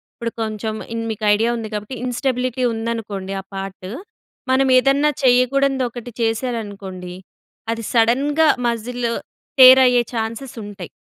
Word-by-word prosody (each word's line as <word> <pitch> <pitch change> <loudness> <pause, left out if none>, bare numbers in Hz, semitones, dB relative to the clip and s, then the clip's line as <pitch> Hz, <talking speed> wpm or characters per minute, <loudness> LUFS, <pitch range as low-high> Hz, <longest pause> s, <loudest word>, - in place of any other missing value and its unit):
ఇప్పుడు 235 0 -4
కొంచెం 220 0 -3 0.2
ఇన్ 230 0 -3
మీకు 215 0 -4
ఐడియా 225 +3 +2
ఉంది 225 - -5
కాబట్టి 210 +5 -5
ఇన్‌స్టబిలిటీ 255 0 -1
ఉందనుకోండి 220 -4 -4
ఆ - - -21
పార్టు, 195 -1 -6 0.6
మనం 265 +1 +3
ఏదన్నా 275 +3 +3
చేయకూడనిది 260 +1 +3
ఒకటి 240 0 -9
చేశారనుకోండి, 205 -6 -3 0.6
అది 230 0 -6
సడన్‍గా 275 +7 +3 0.2
మసిల్ 235 +1 -2 0.5
టేర్ 260 0 +10
అయ్యే 245 -1 +4
ఛాన్సెస్ 230 +3 -4
ఉంటాయి. 195 -4 -8
230 Hz, 125 wpm, -20 LUFS, 215-255 Hz, 0.6 s, టేర్